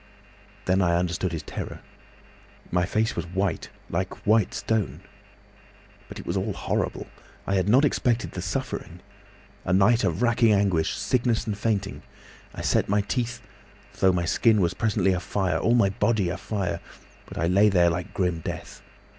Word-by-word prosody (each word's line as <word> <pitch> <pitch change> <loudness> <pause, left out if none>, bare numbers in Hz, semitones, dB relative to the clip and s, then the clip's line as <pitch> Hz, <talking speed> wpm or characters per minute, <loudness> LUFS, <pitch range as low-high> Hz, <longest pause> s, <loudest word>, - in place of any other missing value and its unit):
Then 95 +1 +2
I 85 -2 +3
understood 90 0 -1
his 80 -2 -4
terror.... - - -6 0.9
My 90 +1 +1
face 110 +3 0
was - - -3
white—like 95 0 -3
white 110 -1 +3
stone. 110 -3 -1 1.1
"But - - -9
it - - -8
was 85 - -2
all 100 +2 -1
horrible. - - -2 0.4
I 95 - -1
had 95 +1 +1
not 130 +6 +5
expected 120 -4 0
the - - -5
suffering. - - -4 0.6
A - - -2
night 105 +5 +4
of 95 +4 0
racking 120 -2 +4
anguish, 95 -5 +1
sickness 120 -2 0
and 105 -3 -2
fainting. 105 -2 -2 0.5
I - - -5
set - - +1
my 105 +1 +3
teeth, 120 +3 -3 0.6
though 95 - +5
my 90 -1 0
skin 110 +4 +3
was 85 -2 +1
presently 95 -1 +1
afire, 90 +1 -1
all 115 - +3
my 100 -5 +4
body 105 -3 +1
afire; 100 +1 -3 0.5
but - - -10
I 85 - +1
lay 100 +5 +4
there 90 -3 +4
like 85 +1 -4
grim 90 -3 -1
death. - - -7
100 Hz, 160 wpm, -25 LUFS, 90-110 Hz, 1.1 s, not